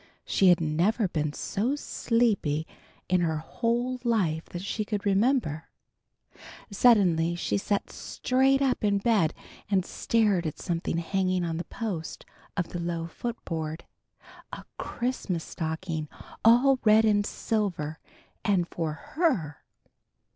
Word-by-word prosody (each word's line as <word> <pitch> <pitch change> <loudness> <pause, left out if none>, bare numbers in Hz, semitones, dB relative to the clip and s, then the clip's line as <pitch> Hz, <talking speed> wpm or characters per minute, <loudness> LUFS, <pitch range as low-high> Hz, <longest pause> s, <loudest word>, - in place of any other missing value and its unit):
She 195 - +3
had 175 -2 +6
never 175 +8 +1
been 155 -3 -1
so 220 - -1
sleepy 220 - 0 0.4
in 180 -1 +2
her 160 -2 0
whole 240 +9 -1
life, 185 -10 +1
that 175 +1 -7
she 215 +2 -2
could 210 -1 -3
remember. 200 - +1 1.1
Suddenly 185 -7 +4
she 175 - -1
sat 200 0 -1
straight 270 +2 +1
up 260 -4 0
in 205 -1 +3
bed 200 -6 +2 0.4
and 190 -3 +2
stared 205 -8 +1
at 155 - -5
something 170 -2 -2
hanging 185 +1 0
on 165 -1 -2
the 170 - -4
post 200 -9 -5 0.3
of 175 - -1
the 175 - -5
low 170 -1 -2
footboard; 165 -5 -5 0.7
a - - -8
Christmas 225 -9 -2
stocking 160 -1 -4 0.3
all 250 +4 +6
red 220 0 +6
and 205 -1 +3
silver, 185 -9 -2 0.4
and 185 -5 +2
for 165 -3 -3
her! 200 - -1
190 Hz, 125 wpm, -27 LUFS, 165-230 Hz, 1.1 s, had